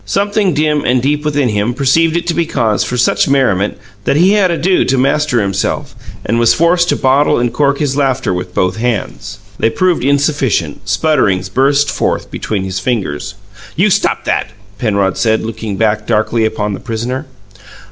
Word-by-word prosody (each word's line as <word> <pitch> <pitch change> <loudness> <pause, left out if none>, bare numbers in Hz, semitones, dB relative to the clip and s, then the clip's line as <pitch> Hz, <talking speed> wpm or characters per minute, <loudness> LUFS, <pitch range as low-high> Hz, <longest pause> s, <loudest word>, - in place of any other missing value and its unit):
Something 200 -3 0
dim 150 -1 +1
and 125 +1 +2
deep 145 +4 -1
within 145 -4 0
him 105 +3 -1
perceived 160 +5 +2
it 170 - -3
to 170 - 0
be 170 0 0
cause 110 -9 0
for 125 - -3
such 125 - +2
merriment 105 -9 +1 0.3
that - - +1
he 180 +6 +4
had 205 -3 +3
ado 175 +2 +1
to 135 - 0
master 140 0 +1
himself, 95 -1 -2 0.3
and 115 +2 0
was 115 -1 +4
forced 175 +1 +2
to - - +2
bottle 135 +3 +2
and 120 -1 -1
cork 140 +2 +1
his 140 -2 -1
laughter 135 -7 0
with 90 0 -5
both 90 +3 0
hands. 105 -3 -3 0.2
They 115 - +2
proved 175 +4 0
insufficient; 140 - 0
sputterings 100 - +1
burst 140 +6 +2
forth - - -2
between 100 -3 -3
his 95 0 -3
fingers. 95 - -3 0.4
"You - - +2
stop - - 0
that!" - - -1 0.3
Penrod 100 -5 0
said, 110 -1 +1
looking 110 -3 -5
back 105 -1 0
darkly 110 0 +1
upon 105 -1 -2
the - - -5
prisoner. 125 +5 -4
125 Hz, 180 wpm, -14 LUFS, 105-150 Hz, 0.4 s, he